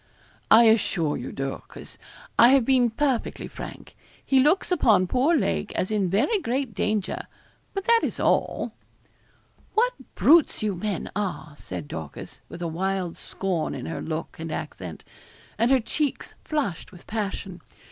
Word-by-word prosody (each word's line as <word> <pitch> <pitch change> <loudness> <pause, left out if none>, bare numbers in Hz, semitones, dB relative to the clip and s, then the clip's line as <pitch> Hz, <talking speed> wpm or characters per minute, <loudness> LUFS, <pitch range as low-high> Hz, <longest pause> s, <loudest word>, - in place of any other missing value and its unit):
'I 225 +2 +8
assure 195 -9 +3
you, 125 - -5
Dorcas, 135 0 -7 0.4
I 235 - +9
have 265 -1 +5
been 255 -2 +4
perfectly 260 0 -1
frank. - - -9 0.3
He 270 - +4
looks 305 +9 +3
upon 220 - +4
poor 260 - +2
Lake 80 - -1
as 185 - -1
in 200 -4 +1
very 235 - +2
great 260 -3 -2
danger 210 0 -1 0.5
but 390 - -2
that 465 0 +5
is - - -3
all.' - - +1 1.0
'What - - +3 0.2
brutes 320 -7 +5
you 210 -2 +1
men 190 0 -3
are!' 190 -7 -3
said 90 -5 -6
Dorcas, 80 -1 -8
with 175 +1 -7
a - - -1
wild 185 +1 -2
scorn 185 -5 -2
in - - -6
her 165 - -4
look 160 0 -5
and 165 0 -5
accent, - - -6 0.6
and 230 +2 +3
her 265 -1 +5
cheeks 285 +4 -2
flushed 275 - -2
with 180 -3 -15
passion. 195 -4 -4
210 Hz, 150 wpm, -25 LUFS, 175-265 Hz, 1.0 s, I